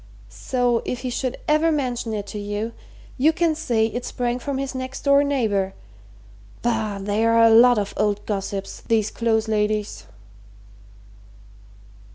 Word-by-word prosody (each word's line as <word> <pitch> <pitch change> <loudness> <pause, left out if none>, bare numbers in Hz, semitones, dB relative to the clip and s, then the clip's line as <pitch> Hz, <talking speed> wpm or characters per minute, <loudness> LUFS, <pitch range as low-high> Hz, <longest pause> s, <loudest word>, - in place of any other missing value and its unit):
So, 245 -2 0
if 250 - -4
he 255 -1 -3
should 255 +1 -2
ever 310 +2 +3
mention 250 -6 -2
it 205 -2 -3
to 205 +1 -6
you, 205 +3 -4 0.5
you 300 +5 +5
can 330 0 +1
say 235 -7 0
it 240 +2 -4
sprang 245 0 -2
from 275 +1 -3
his 275 0 -3
next 260 +1 -5
door 280 0 +5
neighbour. 215 -9 0 0.9
Bah! 220 -3 -1
they're 215 +3 +1
a 230 0 +6
lot 240 +2 +7
of 200 -1 -2
old 205 -1 0
gossips, 195 -1 -4
these 220 -2 +1
Close 220 -1 0
ladies!" 210 - -1
230 Hz, 145 wpm, -22 LUFS, 210-255 Hz, 0.9 s, lot